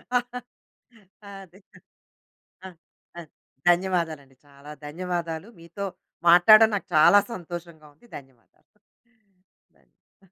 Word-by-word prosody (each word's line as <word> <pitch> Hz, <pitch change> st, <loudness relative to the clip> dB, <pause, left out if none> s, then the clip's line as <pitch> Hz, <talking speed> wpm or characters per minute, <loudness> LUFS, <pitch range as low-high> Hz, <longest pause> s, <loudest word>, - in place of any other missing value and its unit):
ఆ! -, -, +6 dB, 1.3 s
అదే. 185 Hz, +2 st, -19 dB, 1.1 s
ఆ! -, -, -6 dB, 0.5 s
ఆ! -, -, -7 dB, 0.5 s
ధన్యవాదాలండి. 170 Hz, -6 st, -1 dB
చాలా 140 Hz, +1 st, -15 dB
ధన్యవాదాలు. 170 Hz, +2 st, -5 dB
మీతో 170 Hz, +4 st, -8 dB, 0.4 s
మాట్లాడడం 215 Hz, +6 st, +7 dB
నాకు 200 Hz, -, -6 dB
చాలా 155 Hz, +6 st, +6 dB
సంతోషంగా 170 Hz, -4 st, -10 dB
ఉంది. 200 Hz, -, -25 dB
ధన్యవాదాలు. 195 Hz, -, -26 dB
175 Hz, 80 wpm, -24 LUFS, 155-195 Hz, 1.3 s, మాట్లాడడం